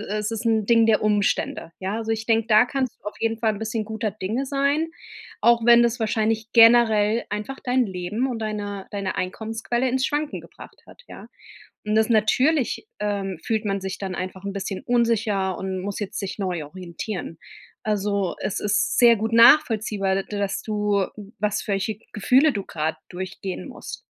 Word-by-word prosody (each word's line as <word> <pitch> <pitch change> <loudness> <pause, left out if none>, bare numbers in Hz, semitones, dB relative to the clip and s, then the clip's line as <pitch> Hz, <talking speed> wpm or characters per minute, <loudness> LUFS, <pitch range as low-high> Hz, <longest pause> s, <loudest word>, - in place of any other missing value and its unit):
äh, 210 0 -3
es 210 +1 -2
ist 225 +1 -4
'n 220 -2 +2
Ding 230 0 +5
der 215 -2 +3
Umstände, 205 -5 0
ja? 195 +3 -2
Also, 225 0 -2
ich 220 0 -3
denke, 225 -1 +2
da 215 +2 +6
kannst 260 -1 -3
du - - -35
auf - - -12
jeden 225 0 0
Fall 220 -2 +2
'n 200 - -7
bisschen 220 0 -2
guter 220 0 -3
Dinge 220 +7 -3
sein, 280 +3 +1 0.5
auch 235 0 +4
wenn 240 0 +8
das 235 +1 +1
wahrscheinlich 220 0 0
generell 225 -1 +5
einfach 210 +6 -4
dein 250 0 +2
Leben 190 +7 -2
und 240 - -3
deine 205 -2 -4
deine 200 -2 -3
Einkommensquelle 225 +6 -2
ins 260 +1 +1
Schwanken 295 +1 -2
gebracht - - -14
hat, - - -16
ja? - - -11 0.6
Und 215 +1 +1
das 220 +1 +3
natürlich, 255 - +2
ähm, 200 -3 -2
fühlt 220 -2 -1
man 195 -1 -1
sich 190 0 -5
dann 190 -2 -4
einfach 185 +1 -6
'n 200 - -3
bisschen 195 +1 -4
unsicher 225 -6 +1
und 190 -1 -3
muss 200 +1 -4
jetzt 205 - -4
sich 195 0 -5
neu 180 -6 -2
orientieren. 175 +1 -6 0.5
Also, 200 -3 -1
es - - -2
ist 205 -1 +1
sehr 235 -1 +7
gut 220 +2 -3
nachvollziehbar, 220 -6 +5
d 205 - -6
dass 200 -1 -2
du, 210 -2 0 0.3
was 210 -1 -1
welche 200 +2 -1
Gefühle 265 +8 +4
du 200 -2 -4
gerade 160 0 -3
durchgehen 185 +1 -6
musst. - - -8
215 Hz, 180 wpm, -23 LUFS, 195-230 Hz, 0.6 s, wenn